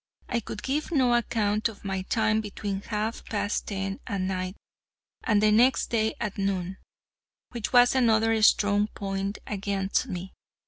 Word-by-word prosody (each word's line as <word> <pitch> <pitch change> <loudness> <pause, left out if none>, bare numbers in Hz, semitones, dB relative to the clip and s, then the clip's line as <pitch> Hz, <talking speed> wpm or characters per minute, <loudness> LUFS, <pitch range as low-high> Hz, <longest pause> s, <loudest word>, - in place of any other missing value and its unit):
I 240 - 0
could 210 -1 -7
give 295 +5 -2
no 260 -6 +3
account 220 -2 +1
of 205 -2 -13
my 190 -1 -2
time 220 +2 +1
between 200 -2 -4
half 215 +2 -3
past 205 0 -2
ten 195 -1 -3
that 200 -2 -2
night 185 0 -2 0.7
and 210 -2 +2
the 215 - +5
next 245 +5 +3
day 220 -1 +1
at 210 -3 -4
noon, 190 -1 -1 0.7
which 235 -3 -4
was 245 -1 +6
another 225 -3 +3
strong 205 -1 +4
point 195 -1 -4
against 200 -1 -1
me. 180 +1 -6
210 Hz, 150 wpm, -27 LUFS, 195-225 Hz, 0.7 s, was